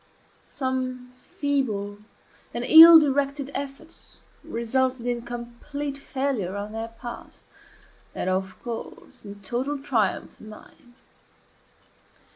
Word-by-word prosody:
Some 255 -1 -4
feeble 235 -8 -3 0.6
and - - -2
ill 325 +1 +11
directed 280 -1 0
efforts 285 +4 -8 0.3
resulted 255 +2 -1
in 240 -1 -1
complete 240 +5 -6
failure 265 -9 -3
on 205 +1 -5
their 225 +1 -4
part, 235 +1 -10 0.8
and, - - -3
of 185 0 -2
course, 235 -2 -8
in 200 0 -10
total 255 +8 -2
triumph 245 -8 -1
on 215 - -11
mine. 240 +3 -16
250 Hz, 100 wpm, -25 LUFS, 225-280 Hz, 0.8 s, ill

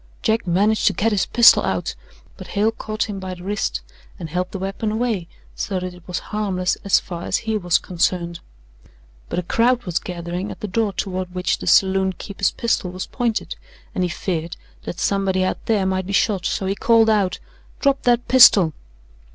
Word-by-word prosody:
Jack 220 -2 +1
managed 205 +5 +2
to - - +4
get 225 +2 +1
his 205 -3 +1
pistol 235 -1 +7
out; - - -2 0.4
but - - -10
Hale 215 +2 +1
caught 215 -1 -3
him 205 -2 -5
by 185 -1 -5
the 175 - -12
wrist 205 +2 -2 0.4
and 165 -4 -7
held 180 +2 -1
the - - -4
weapon 195 +3 -3
away 220 -6 -1 0.3
so 190 -2 -2
that 180 0 -5
it 180 - -14
was 180 - -3 0.2
harmless 190 -4 0
as 200 - +4
far 175 -3 -7
as - - +1
he 220 -1 0
was 175 -5 +2
concerned; 170 -1 -1 0.9
but - - -3
a 180 - 0
crowd 240 +6 +2
was 175 -3 -1
gathering 175 +2 -5
at - - -8
the 210 - -3
door 210 +1 0
toward 185 -2 -4
which 180 0 0
the - - -7
saloon 190 0 +4
keeper's 195 +1 -2
pistol 230 -5 -1
was 185 +1 -5
pointed, 240 -3 -2 0.4
and 185 - -1
he 180 - 0
feared 170 -1 -3 0.3
that 175 - -5
somebody 195 -2 +1
out 185 - -2
there 210 -4 +2
might 190 -1 -1
be 200 - -4
shot; 195 -2 +1
so 195 - -2
he 190 - 0
called 225 +2 +4
out: 205 -4 +2 0.4
"Drop 275 -1 +2
that 245 0 +2
pistol!" 210 -10 +7
195 Hz, 195 wpm, -21 LUFS, 180-215 Hz, 0.9 s, pistol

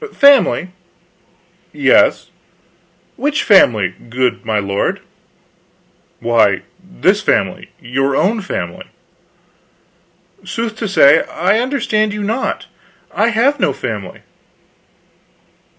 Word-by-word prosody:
"Family?" 280 -9 +4 1.0
"Yes." - - +2 0.9
"Which 295 +1 -1
family, 110 - +4 0.2
good 125 +1 -1
my 110 -1 -1
lord?" 100 -1 -2 1.2
"Why, 115 -4 +2 0.2
this - - 0
family; - - -1
your 135 +3 -2
own 215 +7 +1
family." 195 - -6 1.6
"Sooth 230 -1 -4
to 220 - -3
say, 155 -6 +5
I 190 +6 0
understand 230 -5 -1
you 210 0 -4
not. 225 +6 -3 0.5
I 225 - +1
have 245 +6 +1
no 145 - +1
family." 110 -8 -6
190 Hz, 90 wpm, -16 LUFS, -, 1.6 s, say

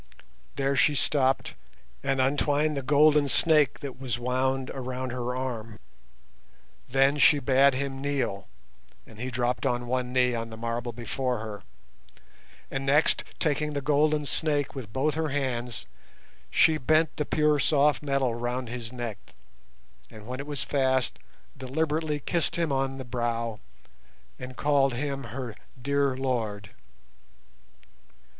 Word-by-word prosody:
There 140 0 0
she 150 +2 +4
stopped 135 -1 +1 0.5
and 135 0 0
untwined 145 +3 +2
the 140 - -2
golden 150 +1 +4
snake 155 0 +3
that 135 -2 -7
was 125 -4 -2
wound 130 +2 -1
around 130 -1 -4
her 125 0 -3
arm. 115 -4 -4 1.1
Then 135 +3 +3
she 145 - +7
bade 135 0 +4
him 135 0 -3
kneel, 135 -9 -2 0.6
and 110 - -15
he 125 +2 -3
dropped 125 0 -1
on 125 -3 0
one 125 0 -1
knee 125 -1 +3
on 115 -1 -3
the 110 - -9
marble 115 +1 -3
before 125 +2 -2
her, 105 -2 -6 1.1
and 135 0 -2
next, 145 +3 +3
taking 150 0 0
the 145 - -1
golden 150 +1 +2
snake 145 -1 0
with 125 -7 -7
both 140 +6 +1
her 160 -1 -1
hands, 125 -4 -2 0.6
she 160 -1 +4
bent 155 +3 +2
the 150 - +1
pure 150 0 +2
soft 145 0 +3
metal 140 -4 0
round 120 +1 -3
his 120 -1 -6
neck, 120 -4 -5 0.9
and 105 -1 -12
when 125 +3 -5
it 140 - -6
was 145 -2 0
fast, 130 -3 0 0.4
deliberately 150 +3 -1
kissed 170 +3 0
him 170 -3 0
on 135 0 0
the 130 - -7
brow 115 -2 -2 0.8
and 125 0 -8
called 140 -3 +2
him 140 +1 -3
her 125 -5 -6 0.3
"dear 140 0 +1
lord". 110 -6 -2
135 Hz, 140 wpm, -27 LUFS, 125-145 Hz, 1.1 s, she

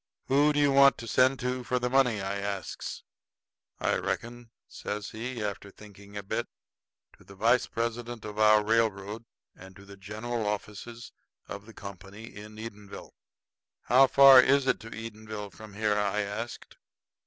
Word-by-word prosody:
"Who 145 +3 +4
do 145 - 0
you 145 -1 +4
want 140 0 +6
to 115 - -8
send 130 +4 +3
to 125 0 -2
for 125 +1 -1
the 125 0 -1
money?" 125 -5 +2
I 100 +1 -3
asks. 100 -1 -5 0.8
"I - - +1
reckon," 120 0 -4 0.2
says 105 0 -6
he, 115 +1 -5
after 100 -1 -5
thinking 100 0 -13
a 100 - -5
bit, 95 - -3 0.7
"to - - -18
the 100 - -14
vice 115 +5 +2
president 120 0 -4
of 105 0 -7
our 105 -1 +5
railroad, 110 0 0 0.3
at 95 0 -14
the 100 +1 -13
general 110 +3 -4
offices 105 +3 -6 0.4
of 100 +1 -8
the 115 - -12
Company 100 +3 -10
in 105 +1 -10
Edenville." 105 -3 -9 0.7
"How 130 +3 +5
far 135 -1 +9
is 140 +1 +3
it - - +1
to 115 - -10
Edenville 110 -2 -7
from 110 -2 -12
here?" 105 0 +1
I 105 0 0
asked. 105 +4 -6
110 Hz, 160 wpm, -28 LUFS, 100-120 Hz, 0.8 s, far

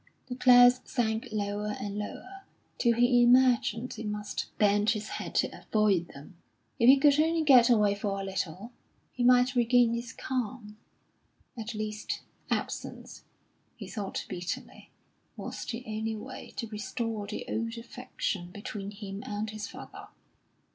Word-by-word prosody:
The 250 - -3
clouds 245 0 +7
sank 220 -3 -1
lower 210 0 -2
and 200 0 -4
lower, 375 - -7 0.4
till 235 -2 +3
he 245 +1 +4
imagined 245 -1 +4
he 225 - -7
must 210 -1 -4
bend 205 0 +3
his 215 -1 -1
head - - -6
to - - +1
avoid 205 -5 +2
them. 145 +5 -13 0.4
If 235 - +4
he 275 - +9
could 285 +1 +4
only 325 +1 +2
get 255 -5 +7
away 210 -4 +4
for 200 -1 -3
a - - -4
little, 195 +2 -4 0.4
he 245 - -3
might 250 +1 +5
regain 240 -1 +4
his 235 0 -4
calm. 245 -4 -4 0.8
At 225 -1 -6
least, 215 0 -4 0.3
absence, - - -4 0.5
he - - -9
thought 205 -4 -4
bitterly, 175 0 -6 0.5
was - - -6
the 235 +1 -5
only 220 0 -3
way 255 +5 -9
to 230 - -4
restore 220 -1 -4
the 210 - -5
old 230 +1 -3
affection 230 -6 -4
between 200 +1 -6
him 200 -1 -7
and 210 +1 -4
his 215 -1 -6
father. - - -10
220 Hz, 145 wpm, -29 LUFS, 205-245 Hz, 0.8 s, he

